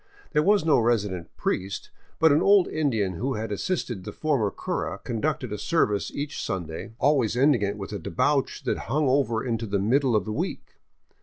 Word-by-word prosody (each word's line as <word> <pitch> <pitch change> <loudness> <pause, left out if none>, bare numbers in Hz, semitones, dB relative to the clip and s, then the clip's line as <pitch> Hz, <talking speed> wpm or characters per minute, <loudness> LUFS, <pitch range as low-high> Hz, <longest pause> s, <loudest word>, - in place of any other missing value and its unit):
There 150 - +3
was 200 0 +3
no 150 -5 +5
resident 105 -7 0
priest, 95 +1 -3 0.3
but 160 -1 +5
an 145 - +4
old 200 -2 +5
Indian 115 -11 0
who 130 +5 -1
had 110 0 -4
assisted 120 - -2
the - - -6
former 140 -10 0
cura - - -3
conducted 125 0 -2
a 105 - -4
service 105 - +1
each 145 +1 -4
Sunday, 85 +2 -4
always 130 -5 +2
ending 135 -3 +4
it 100 0 -1
with 100 +1 -6
a 100 - -3
debauch 135 - 0
that - - -1
hung 150 +3 +2
over 130 -3 +1
into 115 -2 -2
the 100 0 0
mid 115 +9 +2
dle 130 -5 +1
of 105 -4 +1
the 110 - -3
week. - - -4
120 Hz, 190 wpm, -26 LUFS, 105-145 Hz, 0.3 s, no